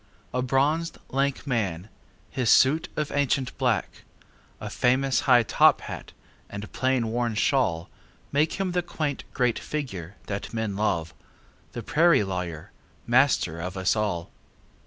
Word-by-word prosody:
A 125 Hz, -, 0 dB
bronzed, 145 Hz, +6 st, +1 dB
lank 135 Hz, +1 st, -1 dB
man! 100 Hz, -, -1 dB, 0.4 s
His 125 Hz, -4 st, 0 dB
suit 150 Hz, +5 st, +4 dB
of 150 Hz, -1 st, -2 dB
ancient 140 Hz, -2 st, 0 dB
black,A 125 Hz, -5 st, -4 dB
famous 130 Hz, 0 st, +2 dB
high 120 Hz, -2 st, +7 dB
top -, -, +4 dB
hat -, -, -8 dB, 0.4 s
and 100 Hz, +1 st, -7 dB
plain 130 Hz, -3 st, +1 dB
worn 120 Hz, -1 st, -1 dB
shawlMake 130 Hz, -, -1 dB
him 190 Hz, -2 st, -2 dB
the 180 Hz, 0 st, +1 dB
quaint 155 Hz, -5 st, -3 dB
great 125 Hz, -2 st, +1 dB
figure 100 Hz, -, -5 dB
that 100 Hz, +3 st, -5 dB
men 110 Hz, -3 st, -2 dB
love, 85 Hz, -6 st, -1 dB, 0.6 s
The 120 Hz, -, -5 dB
prairie 150 Hz, -1 st, +4 dB
lawyer, 90 Hz, -5 st, -5 dB, 0.3 s
master 120 Hz, -, +3 dB
of 90 Hz, +3 st, -5 dB
us 95 Hz, +2 st, +2 dB
all. 100 Hz, -6 st, -2 dB
125 Hz, 130 wpm, -26 LUFS, 100-140 Hz, 0.6 s, high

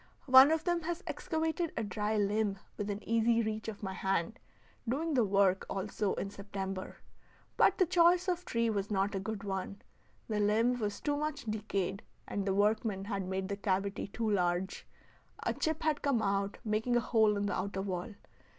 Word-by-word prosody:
One 260 Hz, +1 st, +9 dB
of 320 Hz, 0 st, +1 dB
them 345 Hz, -1 st, +1 dB
has 345 Hz, +3 st, -4 dB
excavated 320 Hz, +1 st, -2 dB
a 230 Hz, -, 0 dB
dry 210 Hz, +1 st, -1 dB
limb 205 Hz, 0 st, +1 dB, 0.2 s
within 205 Hz, 0 st, -4 dB
easy 230 Hz, +1 st, +3 dB
reach 215 Hz, 0 st, -3 dB
of 215 Hz, -1 st, -6 dB
my 190 Hz, -1 st, -3 dB
hand, 195 Hz, +4 st, -1 dB, 0.5 s
doing 310 Hz, +6 st, 0 dB
the 250 Hz, -4 st, +4 dB
work 195 Hz, -2 st, +3 dB
also 195 Hz, +1 st, -2 dB
in 195 Hz, -, -4 dB
September. 195 Hz, -2 st, -5 dB, 0.6 s
But -, -, +4 dB
the 370 Hz, -, +4 dB
choice 350 Hz, +1 st, +4 dB
of 360 Hz, -1 st, 0 dB
tree 230 Hz, -7 st, 0 dB
was 205 Hz, -3 st, -1 dB
not 200 Hz, 0 st, 0 dB
a 195 Hz, -, -1 dB
good 210 Hz, +1 st, -5 dB
one; 195 Hz, 0 st, -4 dB, 0.5 s
the 215 Hz, -2 st, -1 dB
limb 225 Hz, +4 st, +2 dB
was 205 Hz, -2 st, -2 dB
too 290 Hz, -1 st, 0 dB
much 300 Hz, -2 st, -3 dB
decayed, 200 Hz, -3 st, -2 dB, 0.3 s
and 200 Hz, -1 st, -3 dB
the 190 Hz, -, +1 dB
workman 205 Hz, -1 st, +1 dB
had 200 Hz, -3 st, -3 dB
made 190 Hz, 0 st, -2 dB
the 200 Hz, -, -2 dB
cavity 195 Hz, -1 st, -1 dB
too 225 Hz, +3 st, -3 dB
large; 185 Hz, -2 st, 0 dB, 0.6 s
a -, -, 0 dB
chip 315 Hz, 0 st, -2 dB
had 305 Hz, -2 st, +1 dB
come 270 Hz, -6 st, +1 dB
out, 195 Hz, 0 st, 0 dB
making 220 Hz, +3 st, +1 dB
a -, -, +5 dB
hole 220 Hz, -3 st, +3 dB
in 200 Hz, -, -1 dB
the 205 Hz, -, -1 dB
outer 195 Hz, +1 st, -2 dB
wall. 190 Hz, +2 st, -4 dB
210 Hz, 185 wpm, -32 LUFS, 195-245 Hz, 0.6 s, One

